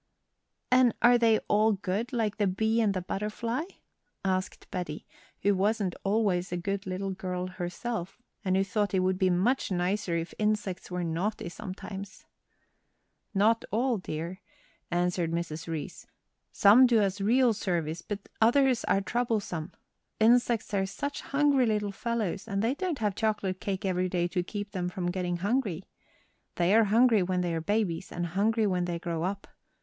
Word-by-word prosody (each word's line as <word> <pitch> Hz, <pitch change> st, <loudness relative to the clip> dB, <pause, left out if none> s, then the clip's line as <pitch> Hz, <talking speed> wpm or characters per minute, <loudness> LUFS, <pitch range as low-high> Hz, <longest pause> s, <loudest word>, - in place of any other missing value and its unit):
"And 255 Hz, -2 st, +5 dB
are 240 Hz, 0 st, +7 dB
they 225 Hz, -2 st, +5 dB
all 215 Hz, +1 st, +4 dB
good, 200 Hz, +4 st, -2 dB
like 220 Hz, -5 st, -1 dB
the 205 Hz, -2 st, +2 dB
bee 220 Hz, +5 st, +1 dB
and 205 Hz, -3 st, +2 dB
the 185 Hz, -, -2 dB
butterfly?" 215 Hz, -, -3 dB, 0.6 s
asked 185 Hz, 0 st, -1 dB
Betty, 175 Hz, -5 st, -4 dB, 0.4 s
who 205 Hz, -, +4 dB
wasn't 200 Hz, -1 st, +1 dB
always 195 Hz, -4 st, +1 dB
a 175 Hz, -, -1 dB
good 195 Hz, +2 st, -3 dB
little 190 Hz, +1 st, -3 dB
girl 185 Hz, -1 st, -3 dB
herself, 185 Hz, +2 st, -5 dB, 0.2 s
and 185 Hz, -2 st, +1 dB
who 195 Hz, -, +3 dB
thought 200 Hz, +1 st, -1 dB
it 185 Hz, -, +3 dB
would 185 Hz, 0 st, +1 dB
be 185 Hz, -, +3 dB
much 195 Hz, +9 st, +1 dB
nicer 180 Hz, 0 st, 0 dB
if 165 Hz, +1 st, -4 dB
insects 210 Hz, -4 st, -1 dB
were 180 Hz, -1 st, -2 dB
naughty 175 Hz, +4 st, -2 dB
sometimes. 195 Hz, +1 st, -8 dB, 1.1 s
"Not 220 Hz, +3 st, +3 dB
all, 235 Hz, 0 st, +1 dB
dear," 170 Hz, +2 st, -5 dB, 0.5 s
answered 175 Hz, -1 st, 0 dB
Mrs. 165 Hz, -1 st, -3 dB
Reece; 160 Hz, -3 st, -5 dB, 0.4 s
"some 230 Hz, +6 st, +7 dB
do 235 Hz, -2 st, +4 dB
us 200 Hz, -1 st, 0 dB
real 240 Hz, +3 st, +4 dB
service, 170 Hz, -5 st, -2 dB
but 200 Hz, +1 st, -6 dB
others 255 Hz, +2 st, +4 dB
are 195 Hz, -, +2 dB
troublesome; 210 Hz, -8 st, -2 dB, 0.5 s
insects 235 Hz, -1 st, +3 dB
are 195 Hz, -1 st, +1 dB
such 285 Hz, +9 st, -4 dB
hungry 280 Hz, -3 st, +2 dB
little 210 Hz, -2 st, 0 dB
fellows, 215 Hz, -2 st, -2 dB
and 200 Hz, -1 st, -1 dB
they 235 Hz, +3 st, +2 dB
don't 350 Hz, 0 st, -2 dB
have 210 Hz, -4 st, 0 dB
chocolate 200 Hz, -3 st, -1 dB
cake 195 Hz, 0 st, -3 dB
every 185 Hz, -1 st, 0 dB
day 175 Hz, -1 st, 0 dB
to 180 Hz, +1 st, 0 dB
keep 205 Hz, +2 st, -5 dB
them 180 Hz, -3 st, -2 dB
from 180 Hz, -1 st, -2 dB
getting 180 Hz, -1 st, -2 dB
hungry. 200 Hz, -2 st, -1 dB, 0.7 s
They 175 Hz, +2 st, +2 dB
are 225 Hz, 0 st, +6 dB
hungry 225 Hz, +1 st, +4 dB
when 180 Hz, 0 st, 0 dB
they 175 Hz, -1 st, -1 dB
are 165 Hz, -, -1 dB
babies 200 Hz, -2 st, -1 dB
and 175 Hz, 0 st, -2 dB
hungry 215 Hz, +6 st, +1 dB
when 180 Hz, -3 st, +1 dB
they 175 Hz, -1 st, -2 dB
grow 170 Hz, -1 st, -3 dB
up. 195 Hz, +3 st, -3 dB
195 Hz, 165 wpm, -29 LUFS, 180-220 Hz, 1.1 s, are